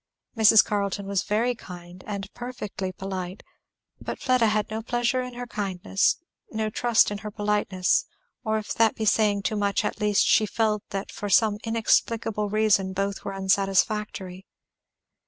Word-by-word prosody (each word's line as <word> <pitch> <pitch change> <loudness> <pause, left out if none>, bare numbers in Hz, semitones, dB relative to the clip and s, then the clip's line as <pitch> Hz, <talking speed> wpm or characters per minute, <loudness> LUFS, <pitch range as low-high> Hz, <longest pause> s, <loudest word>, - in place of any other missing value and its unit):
Mrs. 220 -1 +7
Carleton 200 -1 -2
was 195 -1 0
very 230 +4 0
kind, 180 -4 -11
and 200 -2 -5
perfectly 210 -6 -5
polite; 185 0 -6 0.6
but - - -5
Fleda 255 -3 +2
had 215 0 0
no 220 +1 -3
pleasure 240 +2 0
in 250 -1 -7
her 245 0 -5
kindness, 195 -3 0 0.3
no 220 -1 -2
trust 235 -1 +3
in 205 - -4
her 210 - -6
politeness; 205 -3 +1 0.4
or 220 -2 0
if 215 - -4
that 225 -1 +3
be 220 - -3
saying 205 -1 +2
too 215 - -1
much, 200 -1 0
at - - -3
least 210 -1 +3
she 215 - +4
felt 215 0 0
that 195 0 -4
for 205 - -5
some 210 +1 +3
inexplicable 225 -1 +1
reason 205 -3 +2
both 195 +1 -2
were 195 - -4
unsatisfactory. 195 0 0
210 Hz, 155 wpm, -25 LUFS, 195-220 Hz, 0.6 s, Mrs